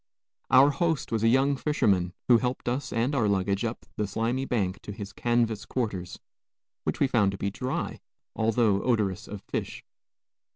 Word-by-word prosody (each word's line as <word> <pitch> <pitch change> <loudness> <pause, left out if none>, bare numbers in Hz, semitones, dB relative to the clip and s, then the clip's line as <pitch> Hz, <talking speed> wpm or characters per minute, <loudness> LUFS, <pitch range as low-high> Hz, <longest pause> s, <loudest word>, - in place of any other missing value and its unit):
Our 135 +3 +7
host 160 -2 -1
was 115 -2 0
a - - +5
young 135 +4 +4
fisherman, 100 - +1
who 120 -2 +6
helped 125 +1 -3
us 125 +4 -2
and 120 +5 0
our 120 -7 +2
luggage 100 +1 +1
up 115 0 -4
the 105 -2 0
slimy 115 +6 -1
bank 100 -8 -1
to - - -7
his 100 -1 -7
canvas 120 -3 0
quarters, 100 -8 -3 0.7
which - - -1
we - - +4
found 110 -7 +2
to - - -5
be 100 +1 -2
dry, 130 +5 -3 0.4
although 110 -2 +2
odorous 105 -5 0
of 105 -1 -8
fish. - - -4
115 Hz, 170 wpm, -27 LUFS, 100-130 Hz, 0.7 s, Our